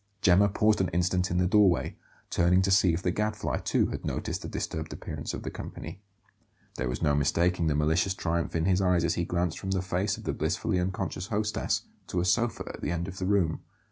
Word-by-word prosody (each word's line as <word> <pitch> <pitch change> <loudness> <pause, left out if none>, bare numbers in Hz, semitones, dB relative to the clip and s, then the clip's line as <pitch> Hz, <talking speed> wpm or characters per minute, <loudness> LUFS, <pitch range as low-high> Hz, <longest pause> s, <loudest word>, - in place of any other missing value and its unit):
Gemma 95 +3 +5
paused 105 +1 +2
an 95 - +1
instant 90 +2 +1
in 85 - -1
the 90 - +3
doorway, 100 -2 +3 0.4
turning 90 +2 +3
to 95 - +1
see 95 -2 +5
if 85 +2 -2
the 90 - +1
Gadfly, 105 +3 -1
too, - - +1
had - - -5
noticed - - -3
the - - -6
disturbed 80 -1 -4
appearance - - -5
of - - -6
the - - -4
company. 100 - -8 0.8
There 65 0 -1
was 65 +6 -3
no 75 -2 +3
mistaking 85 +4 +2
the 75 - +1
malicious 80 +5 +1
triumph 85 -2 -2
in 80 0 +1
his 95 0 +3
eyes 90 -2 +3
as 85 - +1
he 85 - -1
glanced 85 -1 -1
from 95 - -5
the 95 -1 +1
face 95 +3 -1
of - - -10
the - - -2
blissfully 90 - -1
unconscious 95 0 -3
hostess 105 0 -1 0.2
to 90 - -1
a 90 - 0
sofa 115 +4 +1
at - - -10
the - - -2
end 85 0 -2
of 95 0 -7
the 90 - -2
room. 95 -6 +2
90 Hz, 225 wpm, -28 LUFS, 85-95 Hz, 0.8 s, Gemma